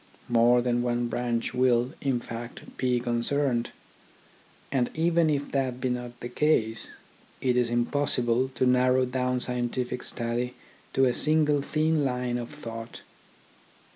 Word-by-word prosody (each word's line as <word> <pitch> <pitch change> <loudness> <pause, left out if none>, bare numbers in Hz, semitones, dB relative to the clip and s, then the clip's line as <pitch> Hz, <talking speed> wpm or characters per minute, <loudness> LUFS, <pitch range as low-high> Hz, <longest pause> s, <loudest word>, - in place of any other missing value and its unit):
More 120 +1 +4
than 120 -1 +1
one 120 0 0
branch 120 -1 -1
will, 125 +1 +2
in 135 -3 +1
fact, 115 0 -7
be 125 -1 +1
concerned; 120 +1 0 1.0
and 125 -3 +1
even 165 0 +3
if 145 -1 -1
that 130 -2 -1
be 130 - -1
not 125 -1 -4
the - - -4
case, 120 -4 +1 0.5
it 125 -2 +1
is 125 -1 +2
impossible 120 0 +1
to - - +2
narrow 125 +1 +4
down 125 0 -1
scientific 125 0 -2
study 120 +1 -3 0.4
to 135 - +4
a 125 - +2
single 150 -1 +3
thin 155 +1 +1
line 125 -2 -1
of 120 - -6
thought. 115 -6 -8
125 Hz, 140 wpm, -27 LUFS, 120-135 Hz, 1.0 s, More